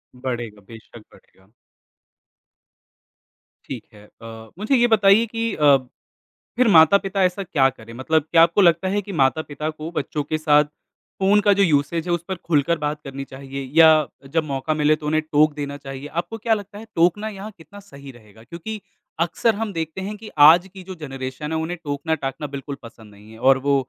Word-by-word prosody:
बढ़ेगा, 120 Hz, -5 st, -5 dB
बेशक 115 Hz, 0 st, -13 dB
बढ़ेगा। 95 Hz, 0 st, -23 dB, 2.2 s
ठीक -, -, -6 dB
है 105 Hz, 0 st, -16 dB, 0.2 s
अ, 110 Hz, -1 st, -10 dB
मुझे 220 Hz, +6 st, +1 dB
ये 240 Hz, -1 st, +4 dB
बताइए 200 Hz, +2 st, +4 dB
कि 230 Hz, 0 st, -3 dB
अ, 145 Hz, -2 st, +5 dB, 0.8 s
फिर 255 Hz, -, +3 dB
माता-पिता 195 Hz, +2 st, +4 dB
ऐसा 185 Hz, +2 st, 0 dB
क्या 135 Hz, -7 st, +2 dB
करें? 115 Hz, -2 st, -13 dB
मतलब 145 Hz, +5 st, 0 dB
क्या 165 Hz, -, +6 dB
आपको 170 Hz, +4 st, +3 dB
लगता 170 Hz, +1 st, +3 dB
है 205 Hz, -, +1 dB
कि 200 Hz, 0 st, -9 dB
माता-पिता 150 Hz, +2 st, 0 dB
को 155 Hz, +1 st, -7 dB
बच्चों 150 Hz, -3 st, -3 dB
के 155 Hz, +2 st, -2 dB
साथ 150 Hz, -1 st, +4 dB, 0.5 s
फ़ोन 195 Hz, +2 st, +4 dB
का 205 Hz, -, +6 dB
जो -, -, +6 dB
यूसेज़ 150 Hz, -2 st, +1 dB
है 165 Hz, -, 0 dB
जो 175 Hz, +1 st, -2 dB
उस 170 Hz, -, -7 dB
पर 190 Hz, -, -3 dB
खुलकर 160 Hz, +2 st, +2 dB
बात 150 Hz, +1 st, -2 dB
करनी 135 Hz, 0 st, -7 dB
चाहिए 135 Hz, +1 st, -7 dB, 0.2 s
या 160 Hz, -, +9 dB, 0.5 s
जब 160 Hz, -, +3 dB
मौका 140 Hz, +1 st, -2 dB
मिले 155 Hz, +1 st, +4 dB
तो 155 Hz, -, -11 dB
उन्हें 155 Hz, +1 st, +1 dB
टोक 150 Hz, 0 st, +4 dB
देना 145 Hz, -1 st, -5 dB
चाहिए, 135 Hz, 0 st, -8 dB
आपको 175 Hz, +8 st, -5 dB
क्या 225 Hz, +1 st, 0 dB
लगता 205 Hz, -1 st, -5 dB
है 225 Hz, -, -10 dB
टोकना 175 Hz, +6 st, +2 dB
यहाँ 205 Hz, +1 st, -8 dB
कितना 165 Hz, +6 st, -14 dB
सही 140 Hz, -3 st, -12 dB
रहेगा? 110 Hz, -2 st, -18 dB
क्योंकि 195 Hz, -, -8 dB, 0.4 s
अक्सर 220 Hz, +6 st, 0 dB
हम 215 Hz, -1 st, -4 dB
देखते 160 Hz, +2 st, -4 dB
हैं 205 Hz, +3 st, -5 dB
कि 215 Hz, +1 st, -11 dB, 0.2 s
आज 175 Hz, +4 st, +6 dB
की 190 Hz, -1 st, -10 dB
जो 185 Hz, 0 st, -9 dB
जनरेशन 135 Hz, +1 st, -6 dB
है 160 Hz, -, -1 dB
उन्हें 165 Hz, +3 st, -3 dB
टोकना-टाकना 145 Hz, -1 st, -3 dB
बिल्कुल 140 Hz, 0 st, -6 dB
पसंद 110 Hz, -2 st, -14 dB
नहीं 105 Hz, +2 st, -17 dB
है 110 Hz, -, -13 dB
और 135 Hz, -, +6 dB
वो 140 Hz, -, +4 dB
155 Hz, 190 wpm, -21 LUFS, 135-190 Hz, 2.2 s, या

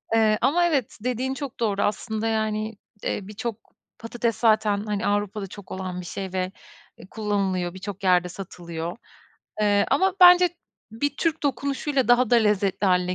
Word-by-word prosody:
Eee, 215 Hz, -1 st, +4 dB
ama 320 Hz, +8 st, +3 dB
evet, 285 Hz, -9 st, 0 dB
dediğin 250 Hz, +2 st, -1 dB
çok 270 Hz, -1 st, -7 dB
doğru 205 Hz, -4 st, 0 dB
aslında, 220 Hz, +1 st, -2 dB
yani, 220 Hz, -1 st, -1 dB, 0.3 s
eee, -, -, -1 dB
birçok 220 Hz, +1 st, -5 dB, 0.4 s
patates 230 Hz, 0 st, -2 dB
zaten, 215 Hz, -2 st, +2 dB
hani, 210 Hz, 0 st, -2 dB
Avrupa'da 205 Hz, 0 st, -1 dB
çok 195 Hz, 0 st, -12 dB
olan 185 Hz, -1 st, -4 dB
bir -, -, -10 dB
şey 190 Hz, +1 st, -6 dB
ve, 185 Hz, 0 st, -1 dB, 0.5 s
eee, -, -, -13 dB
kullanılıyor 195 Hz, -5 st, -1 dB
birçok 195 Hz, +1 st, -7 dB
yerde 180 Hz, -1 st, +3 dB
satılıyor. 170 Hz, -2 st, -6 dB, 0.6 s
Eee, 205 Hz, -1 st, +3 dB
ama 380 Hz, 0 st, +3 dB
bence 360 Hz, 0 st, +8 dB, 0.4 s
bir 260 Hz, +7 st, -2 dB
Türk 330 Hz, -1 st, -1 dB
dokunuşuyla 280 Hz, 0 st, -1 dB
daha 245 Hz, -1 st, +4 dB
da 240 Hz, -, +6 dB
lezzetli 205 Hz, -3 st, +1 dB
hâline 180 Hz, 0 st, +2 dB
215 Hz, 155 wpm, -24 LUFS, 195-245 Hz, 0.6 s, bence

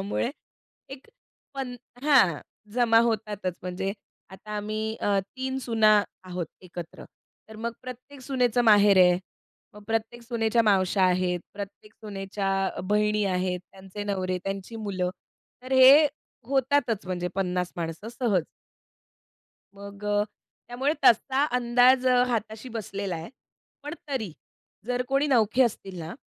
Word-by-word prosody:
त्यामुळे 205 Hz, +5 st, -1 dB, 0.6 s
एक 270 Hz, 0 st, -10 dB, 0.5 s
पन 265 Hz, -2 st, -4 dB, 0.3 s
हां, 255 Hz, -, +4 dB, 0.3 s
जमा 235 Hz, -2 st, +4 dB
होतातच. 210 Hz, -5 st, -2 dB
म्हणजे 185 Hz, +2 st, -3 dB, 0.4 s
आता 190 Hz, +3 st, -12 dB
आम्ही 215 Hz, +1 st, -3 dB
अ, 200 Hz, -1 st, +2 dB, 0.2 s
3 260 Hz, 0 st, -3 dB
सुना 220 Hz, -4 st, +4 dB, 0.2 s
आहोत 180 Hz, -2 st, -4 dB, 0.2 s
एकत्र, 175 Hz, -2 st, -9 dB, 0.4 s
तर 220 Hz, -, -11 dB
मग 235 Hz, +1 st, -3 dB
प्रत्येक 255 Hz, +2 st, -10 dB
सुनेचं 250 Hz, -3 st, +1 dB
माहेर 205 Hz, -3 st, +6 dB
आहे. 180 Hz, -1 st, +6 dB, 0.6 s
मग 210 Hz, -, -12 dB
प्रत्येक 225 Hz, +2 st, -2 dB
सुनेच्या 230 Hz, -1 st, +1 dB
मावश्या 195 Hz, -2 st, +3 dB
आहेत, 180 Hz, -1 st, +1 dB
प्रत्येक 200 Hz, +1 st, -9 dB
सुनेच्या 195 Hz, -1 st, -5 dB, 0.3 s
अ, -, -, -3 dB
बहिणी 210 Hz, +2 st, +1 dB
आहेत, 180 Hz, -1 st, -1 dB
त्यांचे 195 Hz, +2 st, -8 dB
नवरे, 185 Hz, -2 st, -1 dB
त्यांची 195 Hz, +3 st, -5 dB
मुलं, 190 Hz, -4 st, -2 dB, 0.5 s
तर 255 Hz, +1 st, -6 dB
हे 265 Hz, +4 st, +8 dB, 0.4 s
होतातच, 265 Hz, -6 st, +1 dB
म्हणजे 180 Hz, -1 st, -2 dB
50 180 Hz, -2 st, -1 dB
माणसं 165 Hz, +5 st, -5 dB
सहज. 225 Hz, -8 st, 0 dB, 1.3 s
मग 200 Hz, 0 st, -11 dB
अ, 205 Hz, 0 st, +2 dB, 0.4 s
त्यामुळे 265 Hz, +5 st, 0 dB
तसा 265 Hz, +3 st, +4 dB
अंदाज 250 Hz, +2 st, +4 dB
अ, 250 Hz, -1 st, +5 dB
हाताशी 225 Hz, +1 st, -3 dB
बसलेला 200 Hz, -4 st, -4 dB
आहे. 165 Hz, +1 st, -7 dB, 0.5 s
पण 295 Hz, +1 st, -5 dB
तरी 250 Hz, -, -3 dB, 0.5 s
जर 250 Hz, +1 st, 0 dB
कोणी 275 Hz, +2 st, +2 dB
नवखे 235 Hz, -2 st, +3 dB
असतील 195 Hz, -6 st, -3 dB
ना, 165 Hz, +1 st, -6 dB
210 Hz, 130 wpm, -26 LUFS, 190-245 Hz, 1.3 s, हे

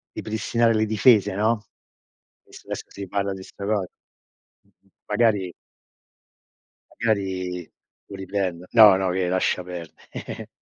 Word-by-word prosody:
ripristinare 115 Hz, +1 st, 0 dB
le 110 Hz, 0 st, +2 dB
difese, 105 Hz, -2 st, +4 dB
no, 110 Hz, +1 st, +1 dB, 0.8 s
visto -, -, -15 dB
adesso -, -, -5 dB
si 100 Hz, -1 st, -8 dB
parla 100 Hz, 0 st, -1 dB
di 95 Hz, -1 st, -8 dB
sta 100 Hz, -, -9 dB
cos 105 Hz, -2 st, 0 dB, 0.8 s
m -, -, -33 dB, 0.2 s
m -, -, -29 dB, 0.2 s
magari 105 Hz, -6 st, +2 dB, 1.5 s
magari 95 Hz, -5 st, -1 dB, 0.4 s
lo 100 Hz, -, -9 dB
riprendo. 95 Hz, -2 st, -3 dB
No, 110 Hz, -4 st, +9 dB
no 95 Hz, -1 st, 0 dB
che 90 Hz, 0 st, 0 dB
lascia 90 Hz, 0 st, 0 dB
perde 90 Hz, -2 st, -8 dB
100 Hz, 125 wpm, -24 LUFS, 95-110 Hz, 1.5 s, No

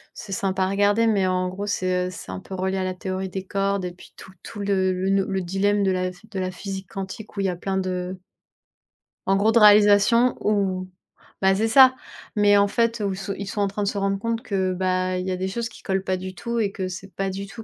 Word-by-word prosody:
c'est 200 Hz, -, -9 dB
sympa 190 Hz, 0 st, 0 dB
à -, -, -1 dB
regarder 205 Hz, +3 st, +3 dB
mais, 200 Hz, -4 st, +2 dB
en 185 Hz, 0 st, 0 dB
gros, 200 Hz, +3 st, -5 dB
c'est, 185 Hz, -2 st, 0 dB
heu, -, -, -4 dB
c'est -, -, -8 dB
un -, -, -5 dB
peu 190 Hz, -, -11 dB
relié 190 Hz, +1 st, -1 dB
à 190 Hz, -, -1 dB
la 185 Hz, 0 st, -2 dB
théorie 185 Hz, +1 st, -4 dB
des 190 Hz, +1 st, -5 dB
cordes 195 Hz, 0 st, -1 dB
et 180 Hz, -, -4 dB
puis 180 Hz, -, -16 dB
tout 190 Hz, -, -12 dB
tout 210 Hz, -, -9 dB
le 190 Hz, -2 st, +1 dB
le 195 Hz, +1 st, +1 dB
le 190 Hz, -1 st, -1 dB
dilemme 200 Hz, +3 st, +1 dB
de 195 Hz, -, +2 dB
la 185 Hz, 0 st, -1 dB
de 200 Hz, +2 st, -9 dB
la 185 Hz, 0 st, -2 dB
physique 190 Hz, +1 st, -6 dB
quantique 195 Hz, +3 st, -7 dB
où -, -, -4 dB
il 195 Hz, -, +1 dB
y -, -, +1 dB
a 180 Hz, -, -2 dB
plein 190 Hz, +2 st, -3 dB
de 185 Hz, 0 st, -3 dB, 1.1 s
en 195 Hz, -, +4 dB
gros, 215 Hz, +3 st, +3 dB
de 235 Hz, -, +6 dB
réalisation 210 Hz, +3 st, +6 dB
ou, 190 Hz, -3 st, 0 dB, 0.5 s
ben 190 Hz, 0 st, +4 dB
c'est 220 Hz, +3 st, +1 dB
ça 260 Hz, +2 st, +7 dB, 0.4 s
mais, 205 Hz, -1 st, +5 dB
en 200 Hz, 0 st, +4 dB
fait, 230 Hz, +2 st, 0 dB
où 195 Hz, -, -1 dB, 0.2 s
ils 200 Hz, -, -5 dB
sont 205 Hz, +1 st, -2 dB
en 200 Hz, -, +2 dB
train 205 Hz, +1 st, -3 dB
de 200 Hz, -, -1 dB
se 205 Hz, -, -1 dB
rendre 195 Hz, 0 st, 0 dB
compte 230 Hz, +2 st, -2 dB
que, 190 Hz, -2 st, -1 dB
bah, 185 Hz, 0 st, 0 dB
il 180 Hz, -, -3 dB
y -, -, -1 dB
a 185 Hz, -, -2 dB
des 190 Hz, -, -2 dB
choses 230 Hz, +4 st, -3 dB
qui -, -, -15 dB
collent 190 Hz, 0 st, -1 dB
pas 185 Hz, -1 st, -1 dB
du 185 Hz, 0 st, -7 dB
tout 235 Hz, +2 st, -3 dB
et 200 Hz, -3 st, +1 dB
que 190 Hz, -2 st, -4 dB
c'est 185 Hz, +1 st, -8 dB
pas 195 Hz, 0 st, -1 dB
du 195 Hz, +1 st, -5 dB
tout 225 Hz, +3 st, -10 dB
195 Hz, 260 wpm, -24 LUFS, 185-205 Hz, 1.1 s, ça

